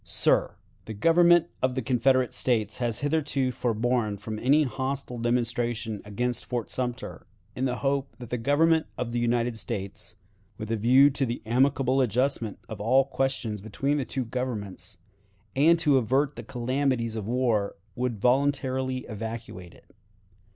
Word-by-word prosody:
"Sir: -, -, +1 dB, 0.3 s
The 110 Hz, -, -6 dB
Government 170 Hz, +6 st, +5 dB, 0.2 s
of 130 Hz, -1 st, +1 dB
the 130 Hz, -, -1 dB
Confederate 130 Hz, +1 st, +2 dB
States 110 Hz, -4 st, 0 dB
has 120 Hz, -1 st, -1 dB
hitherto 145 Hz, -3 st, 0 dB
forborne 115 Hz, -2 st, 0 dB
from 110 Hz, +2 st, -6 dB
any 145 Hz, +6 st, +4 dB
hostile 130 Hz, -2 st, -3 dB
demonstration 120 Hz, -2 st, -1 dB
against 120 Hz, +4 st, -2 dB
Fort 120 Hz, -3 st, -4 dB
Sumter, 125 Hz, -1 st, -4 dB, 0.3 s
in 130 Hz, -, -1 dB
the 125 Hz, -1 st, 0 dB
hope 135 Hz, 0 st, 0 dB
that 120 Hz, -2 st, -10 dB
the 125 Hz, -, -1 dB
Government 160 Hz, +6 st, +3 dB
of 120 Hz, -2 st, -3 dB
the 120 Hz, -, -1 dB
United 120 Hz, -1 st, 0 dB
States, 105 Hz, -2 st, -5 dB, 0.4 s
with 110 Hz, +1 st, -6 dB
a -, -, +2 dB
view 130 Hz, +6 st, +5 dB
to 135 Hz, 0 st, -2 dB
the 120 Hz, -2 st, -3 dB
amicable 130 Hz, +2 st, +2 dB
adjustment 125 Hz, -2 st, 0 dB
of 105 Hz, -2 st, -7 dB
all 130 Hz, +5 st, +4 dB
questions 135 Hz, -6 st, -2 dB
between 135 Hz, +8 st, -1 dB
the 140 Hz, -, 0 dB
two 130 Hz, -1 st, -3 dB
Governments, 105 Hz, -6 st, -4 dB, 0.6 s
and 160 Hz, +5 st, +5 dB
to 145 Hz, -4 st, +3 dB
avert 135 Hz, +5 st, +1 dB
the 120 Hz, -, -6 dB
calamities 125 Hz, -1 st, -1 dB
of 105 Hz, -2 st, -4 dB
war, 115 Hz, -4 st, 0 dB, 0.2 s
would 120 Hz, -3 st, -2 dB
voluntarily 130 Hz, +1 st, +1 dB
evacuate 110 Hz, -5 st, -7 dB
it. -, -, -23 dB
125 Hz, 150 wpm, -27 LUFS, 115-135 Hz, 0.6 s, Government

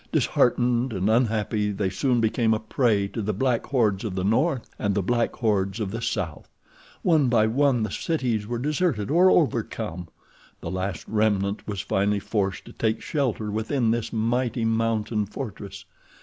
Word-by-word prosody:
Disheartened 120 Hz, 0 st, +2 dB
and 95 Hz, +2 st, +1 dB
unhappy, 110 Hz, -2 st, +1 dB
they 100 Hz, -1 st, -1 dB
soon 125 Hz, -4 st, +1 dB
became 110 Hz, 0 st, +2 dB
a -, -, -2 dB
prey 110 Hz, -3 st, +1 dB
to 115 Hz, -, -4 dB
the 105 Hz, -1 st, -2 dB
black 125 Hz, +1 st, 0 dB
hordes 110 Hz, -8 st, +1 dB
of 105 Hz, -5 st, -4 dB
the 95 Hz, -, -1 dB
north 125 Hz, -, +1 dB
and 100 Hz, -2 st, 0 dB
the 100 Hz, -, +1 dB
black 120 Hz, +4 st, 0 dB
hordes 100 Hz, -3 st, 0 dB
of 100 Hz, -3 st, -2 dB
the 115 Hz, +2 st, -4 dB
south. 80 Hz, -8 st, -3 dB, 0.5 s
One 155 Hz, -6 st, +4 dB
by 115 Hz, -3 st, +4 dB
one 125 Hz, +1 st, +2 dB
the 110 Hz, -, -3 dB
cities 120 Hz, -10 st, -1 dB
were 120 Hz, +1 st, -2 dB
deserted 145 Hz, -, 0 dB
or 180 Hz, +4 st, +6 dB
overcome. 110 Hz, -, 0 dB, 0.5 s
The -, -, -6 dB
last 95 Hz, -2 st, -4 dB
remnant 105 Hz, -2 st, 0 dB
was 100 Hz, -2 st, -3 dB
finally 100 Hz, +1 st, +1 dB
forced 100 Hz, -3 st, -2 dB
to -, -, -12 dB
take 110 Hz, 0 st, 0 dB
shelter 120 Hz, -8 st, -2 dB
within 110 Hz, +2 st, 0 dB
this 115 Hz, -1 st, -2 dB
mighty 115 Hz, +1 st, 0 dB
mountain 110 Hz, -2 st, 0 dB
fortress. 100 Hz, -4 st, -7 dB
110 Hz, 165 wpm, -25 LUFS, 100-120 Hz, 0.5 s, or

